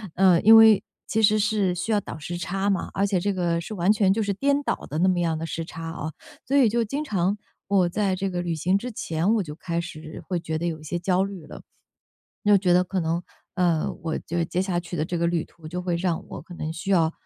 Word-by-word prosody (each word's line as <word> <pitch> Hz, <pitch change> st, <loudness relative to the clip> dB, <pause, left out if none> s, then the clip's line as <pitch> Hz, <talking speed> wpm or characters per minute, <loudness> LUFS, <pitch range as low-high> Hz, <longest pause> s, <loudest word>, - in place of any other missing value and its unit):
呃， 185 Hz, -2 st, +5 dB
因 225 Hz, +2 st, +8 dB
为 220 Hz, -2 st, +7 dB, 0.2 s
其 220 Hz, -, 0 dB
实 215 Hz, 0 st, +5 dB
是 205 Hz, -4 st, +1 dB
需 180 Hz, +6 st, -2 dB
要 210 Hz, -2 st, +2 dB
倒 155 Hz, -, -8 dB
时 175 Hz, +3 st, -5 dB
差 195 Hz, +3 st, -1 dB
嘛， 190 Hz, -, -1 dB
而 200 Hz, +1 st, +2 dB
且 195 Hz, -3 st, +1 dB
这 200 Hz, +2 st, 0 dB
个 170 Hz, -2 st, 0 dB
是 215 Hz, +5 st, -7 dB
完 185 Hz, +2 st, +3 dB
全 200 Hz, -3 st, +3 dB
就 215 Hz, +3 st, +1 dB
是 200 Hz, -1 st, -1 dB
颠 280 Hz, +6 st, +1 dB
倒 -, -, 0 dB
的 150 Hz, -, -3 dB
那 180 Hz, +3 st, +3 dB
么 180 Hz, -2 st, +2 dB
样 165 Hz, -2 st, 0 dB
的 165 Hz, -, -4 dB
时 165 Hz, 0 st, -4 dB
差 165 Hz, 0 st, -8 dB
啊。 160 Hz, -1 st, -5 dB, 0.4 s
所 275 Hz, +3 st, +2 dB
以 260 Hz, -5 st, +6 dB
就 235 Hz, +1 st, +1 dB
经 280 Hz, +8 st, -3 dB
常 200 Hz, -, 0 dB, 0.3 s
我 190 Hz, -3 st, +3 dB
在 195 Hz, +1 st, 0 dB
这 190 Hz, +1 st, -2 dB
个 175 Hz, -1 st, -2 dB
旅 170 Hz, -2 st, -2 dB
行 185 Hz, +5 st, +1 dB
之 250 Hz, +4 st, -5 dB
前 180 Hz, +1 st, 0 dB
我 210 Hz, -, +1 dB
就 150 Hz, -4 st, -7 dB
开 170 Hz, +1 st, -3 dB
始 160 Hz, -2 st, -8 dB
会 180 Hz, -2 st, -1 dB
觉 160 Hz, -1 st, -3 dB
得 170 Hz, -, -3 dB
有 165 Hz, -2 st, -2 dB
一 155 Hz, -, -14 dB
些 175 Hz, +3 st, -3 dB
焦 180 Hz, +2 st, +1 dB
虑 195 Hz, -5 st, -6 dB
了。 -, -, -10 dB, 0.9 s
就 205 Hz, -1 st, +7 dB
觉 185 Hz, -2 st, +1 dB
得 180 Hz, +1 st, +5 dB
可 185 Hz, -1 st, -2 dB
能， 165 Hz, +2 st, -1 dB, 0.3 s
呃， 170 Hz, -4 st, +1 dB
我 160 Hz, -1 st, -1 dB
就 170 Hz, +1 st, -3 dB
接 180 Hz, -, -1 dB
下 185 Hz, -2 st, -1 dB
去 175 Hz, 0 st, -7 dB
的 155 Hz, -, 0 dB
这 175 Hz, +2 st, -3 dB
个 170 Hz, 0 st, +1 dB
旅 170 Hz, -2 st, 0 dB
途， 160 Hz, -2 st, -14 dB
就 180 Hz, +2 st, -4 dB
会 175 Hz, -2 st, -1 dB
让 170 Hz, -2 st, -1 dB
我 -, -, -7 dB
可 175 Hz, -, -12 dB
能 160 Hz, -2 st, -4 dB
需 170 Hz, +5 st, -6 dB
要 165 Hz, -4 st, +3 dB
180 Hz, 280 characters per minute, -25 LUFS, 170-200 Hz, 0.9 s, 因